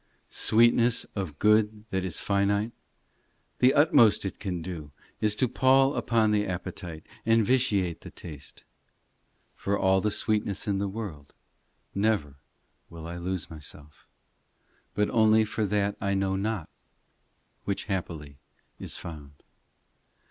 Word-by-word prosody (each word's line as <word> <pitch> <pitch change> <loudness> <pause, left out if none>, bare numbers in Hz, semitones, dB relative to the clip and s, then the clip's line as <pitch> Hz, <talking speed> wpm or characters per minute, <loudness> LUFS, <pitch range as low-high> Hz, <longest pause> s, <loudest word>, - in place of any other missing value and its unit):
Sweetness 120 +1 +4
of 95 -8 -4
good 105 +1 +2
that 95 -1 -1
is 95 -3 -2
finite, 100 +2 +1 0.9
The 130 +3 +5
utmost 130 -9 +5
it 95 - -5
can 90 -5 -4
do 80 -5 -7 0.3
Is 105 -1 +1
to 130 - +1
pall 135 +3 +4
upon 110 -2 +2
the 105 0 +1
appetite 85 -3 -6 0.2
And 115 -1 +3
vitiate 100 -9 +1
the - - -9
taste. 75 -5 -10 0.9
For 100 +1 -2
all 95 0 +3
the 105 - +1
sweetness 105 -1 -1
in 100 -1 0
the 100 0 -1
world 95 -9 -7 0.6
Never 100 -9 0 0.5
will 85 -1 -10
I 85 +1 -6
lose 90 -1 -4
myself, 75 -1 -11 0.9
But 105 0 +1
only 110 -1 +4
for 110 0 -2
that 100 0 0
I 100 -1 0
know 95 0 0
not, 100 -3 -2 1.0
Which 100 - -2
happily 80 -8 -5 0.4
is - - -4
found. 75 -4 -10
100 Hz, 130 wpm, -27 LUFS, 85-110 Hz, 1.0 s, The